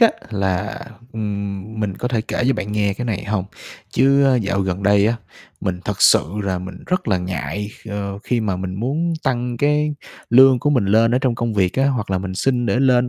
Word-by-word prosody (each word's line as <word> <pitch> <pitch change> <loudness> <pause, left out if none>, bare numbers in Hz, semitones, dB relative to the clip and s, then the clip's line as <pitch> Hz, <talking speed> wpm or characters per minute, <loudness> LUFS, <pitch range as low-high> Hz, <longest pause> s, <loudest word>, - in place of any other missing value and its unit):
á 230 - +8 0.2
là, 100 0 -1 0.3
ừm, 105 0 -4
mình 100 -3 -1
có 125 - -2
thể 120 -3 0
kể 110 - -3
cho 135 - +3
bạn 105 - -4
nghe 100 -2 +1
cái 120 - -5
này 110 -5 -2
hông? 105 -2 -1 0.5
Chứ 140 +2 +4
á 135 -2 +4
dạo 100 -4 0
gần 95 0 -2
đây 100 +1 +4
á, 115 +2 +1 0.4
mình 90 -2 -2
thật 105 -2 -2
sự - - +6 0.2
là 95 -2 -1
mình 90 0 -8
rất 180 - -1
là 95 -3 +2
ngại, 95 +3 -4 0.2
ờ, 100 -1 -4
khi 120 -1 0
mà 100 -4 -1
mình 95 0 -4
muốn 145 - -1
tăng 125 -3 -1
cái 150 +3 +1 0.4
lương 130 +1 +7
của 145 +5 +1
mình 125 -8 +2
lên 115 +4 +4
ở - - +4
trong 130 -3 +1
công 115 -1 -2
việc 95 -3 +2
á, 135 +1 +2
hoặc 120 -7 -2
là 95 - +1
mình 95 0 -5
xin 120 +4 0
để 120 - +1
lên 125 -2 +3
110 Hz, 225 wpm, -20 LUFS, 100-125 Hz, 0.5 s, á